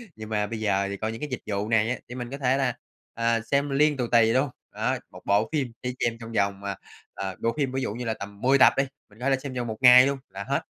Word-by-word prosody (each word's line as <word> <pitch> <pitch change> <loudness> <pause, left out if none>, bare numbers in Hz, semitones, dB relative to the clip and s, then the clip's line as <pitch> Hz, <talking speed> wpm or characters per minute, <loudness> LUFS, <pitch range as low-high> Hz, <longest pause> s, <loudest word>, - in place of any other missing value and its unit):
Nhưng 110 0 -9
mà 105 -1 0
bây 110 0 -5
giờ 100 -2 +1
thì 100 - -4
coi 110 +2 -2
những 115 - -8
cái 150 - -4
dịch 130 - -4
vụ 105 +1 -2
này 110 0 +3
á, 125 - 0
thì 125 - -7
mình 125 0 -6
có 140 - -4
thể 130 -1 +2
là, 130 -3 +1 0.4
à, 115 -1 +1
xem 140 +5 0
liên 145 +1 +3
tù 120 -2 -1
tì 115 -1 +5
luôn, 130 +1 +2 0.2
đó, - - 0
1 - - -12
bộ 105 +4 +2
phim 135 -6 -1
chỉ 125 0 -2
xem 115 -1 0
trong 115 0 -8
vòng, 100 -2 0
à, 100 0 -4 0.4
à 95 -2 -4
bộ 115 - +2
phim 135 -3 0
ví 135 0 -2
dụ 105 - -2
như 125 +1 -5
là 110 - 0
tầm 100 0 -9
10 135 +2 +4
tập - - +7
đi, 135 - +4 0.3
mình 105 +2 -20
có 135 +2 0
thể 135 - +4
xem 135 -1 -6
vòng 120 -1 -3
1 110 -1 -4
ngày 125 +1 +9
luôn 140 -1 -1
là 95 +1 -6
hết. - - -1
115 Hz, 295 wpm, -26 LUFS, 105-130 Hz, 0.4 s, ngày